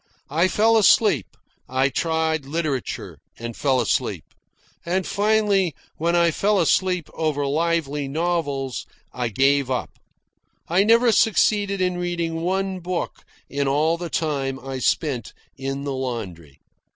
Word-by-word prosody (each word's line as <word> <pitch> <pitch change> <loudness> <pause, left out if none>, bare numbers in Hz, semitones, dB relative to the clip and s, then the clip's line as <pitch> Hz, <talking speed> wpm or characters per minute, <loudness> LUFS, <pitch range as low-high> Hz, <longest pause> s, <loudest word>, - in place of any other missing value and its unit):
I 165 +5 +3
fell 225 +4 +3
asleep. 205 - +4 0.4
I 130 +2 +2
tried 160 0 -1
literature, 150 -4 -3 0.2
and 120 0 -6
fell 135 -3 +1
asleep. 120 - 0 0.6
And 180 +2 -1
finally, 205 -4 +2 0.2
when 170 +2 +1
I 170 -1 +4
fell 205 +5 +1
asleep 180 -3 +1
over 150 -3 -1
lively 150 -1 0
novels, 145 -4 -2 0.3
I 125 -1 -2
gave 135 +4 +2
up. 125 -1 -2 0.8
I 180 +4 +3
never 230 +2 +5
succeeded 205 -2 +2
in 180 -1 0
reading 170 -2 -2
one 190 +2 -1
book 180 0 -4 0.2
in 140 0 -1
all 150 +4 +2
the 170 0 -6
time 140 -6 -1
I 135 0 -6
spent 130 -2 -1 0.2
in 135 +1 -4
the 140 -1 -3
laundry. 100 - -5
160 Hz, 130 wpm, -23 LUFS, 135-180 Hz, 0.8 s, never